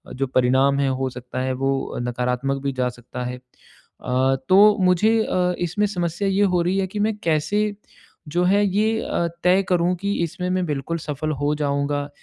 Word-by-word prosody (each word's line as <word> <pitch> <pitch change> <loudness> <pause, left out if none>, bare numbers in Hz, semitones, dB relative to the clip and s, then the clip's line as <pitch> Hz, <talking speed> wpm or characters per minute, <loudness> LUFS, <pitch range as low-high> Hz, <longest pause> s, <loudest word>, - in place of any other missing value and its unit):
जो 135 0 -1
परिणाम 130 +2 +2
है, 135 -1 +2
हो 130 0 -1
सकता 125 0 -7
है, 130 0 -1
वो 135 +1 -2
नकारात्मक 125 +3 -2
भी 140 - 0
जा 125 -1 0
सकता 125 +1 -8
है। 125 0 -4
अ, 130 +1 -3
तो 205 +3 +6
मुझे 210 +5 +3
अ, 180 0 0
इसमें 190 +5 0
समस्या 175 0 -2
ये 195 +2 +2
हो 175 - +3
रही 185 +3 0
है 190 - 0
कि 205 +2 -6
मैं 215 0 +1
कैसे 205 +7 0 0.5
जो 175 +4 +1
है, 200 +2 +3
ये 215 +3 +1
अ, 170 - -1 0.2
तय 185 +2 +4
करूँ 180 0 +2
कि 200 0 -1
इसमें 180 +2 -3
मैं 185 -1 0
बिल्कुल 150 +2 -3
सफल 155 +1 -3
हो 150 +1 +2
जाऊँगा 145 0 -1
155 Hz, 185 wpm, -22 LUFS, 135-185 Hz, 0.5 s, तो